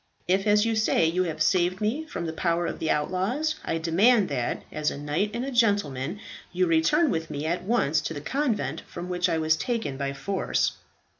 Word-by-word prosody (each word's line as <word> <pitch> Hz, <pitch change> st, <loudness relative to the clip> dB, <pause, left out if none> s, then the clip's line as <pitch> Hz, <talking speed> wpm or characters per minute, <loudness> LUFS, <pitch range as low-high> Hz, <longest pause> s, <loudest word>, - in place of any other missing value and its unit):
If, 190 Hz, +3 st, +2 dB
as 210 Hz, +1 st, +4 dB
you 225 Hz, 0 st, +1 dB
say, 220 Hz, -6 st, +3 dB
you 180 Hz, +3 st, +1 dB
have 155 Hz, -2 st, -1 dB
saved 180 Hz, +2 st, +2 dB
me 235 Hz, +10 st, -1 dB
from 175 Hz, -, -5 dB
the 160 Hz, -, -3 dB
power 170 Hz, +1 st, 0 dB
of -, -, -4 dB
the 160 Hz, -, -2 dB
outlaws, 200 Hz, -, 0 dB
I 165 Hz, -, -1 dB
demand 195 Hz, +7 st, +3 dB
that, 125 Hz, -4 st, -2 dB
as 150 Hz, -1 st, 0 dB
a -, -, -6 dB
knight 150 Hz, +8 st, -1 dB
and 240 Hz, +2 st, -2 dB
a 275 Hz, -, -4 dB
gentleman, 200 Hz, -, +1 dB, 0.3 s
you 185 Hz, +1 st, +1 dB
return 175 Hz, -, +3 dB
with 160 Hz, 0 st, -2 dB
me 145 Hz, +1 st, -4 dB
at 170 Hz, +3 st, -2 dB
once 160 Hz, -10 st, +2 dB
to 165 Hz, -, -4 dB
the -, -, -4 dB
convent 210 Hz, -, -1 dB
from 175 Hz, +1 st, -7 dB
which 180 Hz, 0 st, 0 dB
I 165 Hz, -, +1 dB
was 160 Hz, 0 st, +2 dB
taken 220 Hz, -, -2 dB
by 140 Hz, 0 st, -2 dB
force." 190 Hz, +7 st, -1 dB
180 Hz, 210 wpm, -26 LUFS, 160-215 Hz, 0.3 s, as